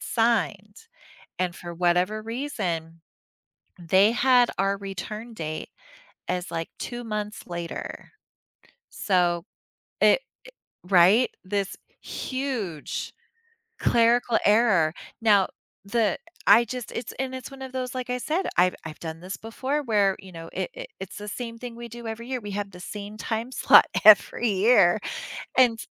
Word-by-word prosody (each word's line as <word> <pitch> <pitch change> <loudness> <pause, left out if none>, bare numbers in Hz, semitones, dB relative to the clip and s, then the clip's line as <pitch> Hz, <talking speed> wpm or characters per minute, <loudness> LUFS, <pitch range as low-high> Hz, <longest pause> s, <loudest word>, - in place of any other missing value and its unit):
signed, 210 -3 0 0.6
and 180 -1 -1
for 175 -1 -8
whatever 180 +5 +1
reason, 195 - -4 0.8
they 190 +5 +4
had 245 -1 +4
our 195 +1 +1
return 210 +4 -6
date 155 -5 -5 0.6
as, 180 +1 -2
like, 165 -1 -3
2 240 -1 -5
months 210 -1 -4
later. 170 -1 -6 0.8
So 175 -3 +1 0.6
it - - +5 0.4
i - - -25
Right? 195 +6 +6 0.2
This 200 0 -2 0.3
huge 250 - -4 0.7
clerical 235 0 +3
error. 205 -7 +4 0.3
Now, 205 -4 +5 0.4
the 205 -1 +1 0.3
I 220 +4 +7
just 250 -1 -6
it's 235 - -5
and 260 0 -2
it's 260 +1 -7
one 270 -1 -10
of 260 -1 -7
those, 255 -1 -4
like 255 -1 -4
I 250 - 0
said, 320 +9 -1
I've 180 +1 +4
I've 155 -1 -8
done 160 -1 -6
this 185 +2 -6
before 260 +6 -3
where, 205 -6 +2
you 190 -1 -13
know, 165 -1 -9
it - - -3
it - - -8
it's 190 0 -7
the 210 - -7
same 230 +2 -5
thing 240 -1 -8
we 235 0 -8
do 235 0 -9
every 225 +2 -6
year. 260 -1 -2
We 205 -2 -7
have 200 0 -3
the 180 - -11
same 205 +2 -7
time 230 +3 -3
slot - - +7 0.2
every 215 +2 +6
year 200 -2 +5 0.6
and 245 -3 +5
s - - -8
210 Hz, 150 wpm, -25 LUFS, 185-240 Hz, 0.8 s, I